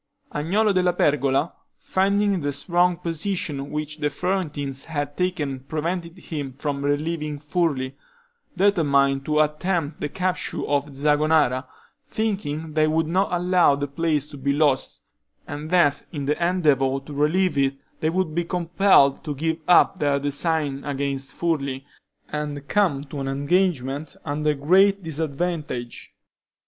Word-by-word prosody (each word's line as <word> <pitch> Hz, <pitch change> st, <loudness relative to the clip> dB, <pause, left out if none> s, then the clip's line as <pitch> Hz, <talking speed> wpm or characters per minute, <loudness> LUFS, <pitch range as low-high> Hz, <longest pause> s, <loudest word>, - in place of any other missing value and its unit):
Agnolo 200 Hz, +8 st, +1 dB
della 180 Hz, -1 st, +2 dB
Pergola, 145 Hz, -1 st, +1 dB, 0.2 s
finding 200 Hz, 0 st, +1 dB
the 145 Hz, -2 st, -1 dB
strong 175 Hz, +4 st, +1 dB
position 165 Hz, -4 st, -3 dB
which 150 Hz, 0 st, -4 dB
the 150 Hz, -1 st, +1 dB
Florentines 145 Hz, -5 st, -2 dB
had 145 Hz, -2 st, -3 dB
taken 160 Hz, -7 st, -1 dB
prevented 170 Hz, +5 st, -4 dB
him 145 Hz, -7 st, -5 dB
from 140 Hz, +1 st, -3 dB
relieving 150 Hz, +1 st, -1 dB
Furli, 145 Hz, -4 st, -1 dB, 0.6 s
determined 140 Hz, -8 st, +3 dB
to 150 Hz, 0 st, +1 dB
attempt 155 Hz, 0 st, -1 dB
the -, -, -2 dB
capture 185 Hz, +3 st, -2 dB
of 145 Hz, -1 st, -1 dB
Zagonara, 150 Hz, -2 st, +2 dB, 0.4 s
thinking 175 Hz, -9 st, -3 dB
they 155 Hz, 0 st, +3 dB
would 160 Hz, +1 st, +1 dB
not 185 Hz, +5 st, +1 dB
allow 180 Hz, -4 st, +3 dB
that 140 Hz, 0 st, -5 dB
place 155 Hz, -4 st, +1 dB
to 145 Hz, -, -10 dB
be 140 Hz, +1 st, 0 dB
lost, 145 Hz, -2 st, +1 dB, 0.4 s
and 150 Hz, +2 st, -6 dB
that 170 Hz, -5 st, +3 dB
in 145 Hz, -5 st, -4 dB
the 150 Hz, +4 st, 0 dB
endeavor 145 Hz, -7 st, +2 dB
to 150 Hz, -, -8 dB
relieve 160 Hz, +6 st, +2 dB
it 135 Hz, -1 st, +2 dB, 0.2 s
they 155 Hz, -, +1 dB
would 180 Hz, -2 st, -1 dB
be 170 Hz, +2 st, 0 dB
compelled 170 Hz, -4 st, +3 dB
to 150 Hz, -3 st, -4 dB
give 160 Hz, +3 st, -1 dB
up 180 Hz, +1 st, +5 dB
their 145 Hz, -2 st, +2 dB
design 145 Hz, 0 st, -1 dB
against 140 Hz, -1 st, -3 dB
Furli, 140 Hz, -6 st, -1 dB, 0.5 s
and 145 Hz, -1 st, -4 dB
come 170 Hz, -7 st, +1 dB
to 145 Hz, 0 st, -7 dB
an 135 Hz, -, -3 dB
engagement 145 Hz, -1 st, 0 dB
under 150 Hz, 0 st, 0 dB
great 190 Hz, +7 st, +4 dB
disadvantage. 155 Hz, -4 st, -4 dB
150 Hz, 135 wpm, -23 LUFS, 140-175 Hz, 0.6 s, up